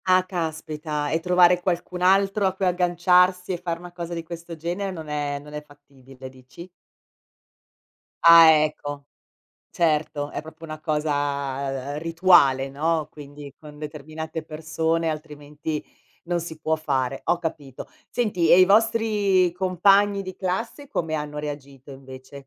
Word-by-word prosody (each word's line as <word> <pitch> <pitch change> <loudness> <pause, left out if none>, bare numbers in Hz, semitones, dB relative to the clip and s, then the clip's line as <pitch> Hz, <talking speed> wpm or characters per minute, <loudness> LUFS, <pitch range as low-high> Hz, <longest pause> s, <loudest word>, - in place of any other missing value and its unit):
Ah 185 0 +4
caspita 155 -4 -4
e 160 - +1
trovare 180 +1 +4
qualcun 180 0 -3
altro 195 +2 +3
a 190 - -1
cui 190 - -2
agganciarsi 180 +1 +2
e 180 - -2
fare 170 -2 -3
una 175 +1 -11
cosa 170 -1 -6
di 165 - -5
questo 170 0 -8
genere 175 +5 -4
non 160 -5 -8
è 145 -1 -2
non 150 +1 -12
è 150 - -5
fattibile 135 -3 -15
dici? 130 +7 -13 1.5
Ah 165 -1 +9
ecco, 150 -2 -1 0.7
certo 150 -3 0
è - - -4
proprio 160 +1 -13
una 155 -1 -8
cosa, 140 -3 -2
ehm, - - -3
rituale, 165 -5 +3
no. 155 +2 -1
Quindi 145 -1 -11
con 150 -1 -13
determinate 155 +2 -7
persone 160 +1 -2
altrimenti 150 0 -6 0.4
non 175 0 -1
si 160 -1 -8
può 160 +1 0
fare, 135 -4 -2
ho 175 - +1
capito. 150 -6 -6 0.2
Senti 205 -9 0
e 175 - +8
i 185 - +8
vostri 205 -3 +2
compagni 195 +3 +3
di 185 -1 -8
classe 225 +10 -4
come 165 - -3
hanno 150 -1 -4
reagito 140 -2 -8
invece? 135 +1 -12
160 Hz, 145 wpm, -24 LUFS, 145-180 Hz, 1.5 s, Ah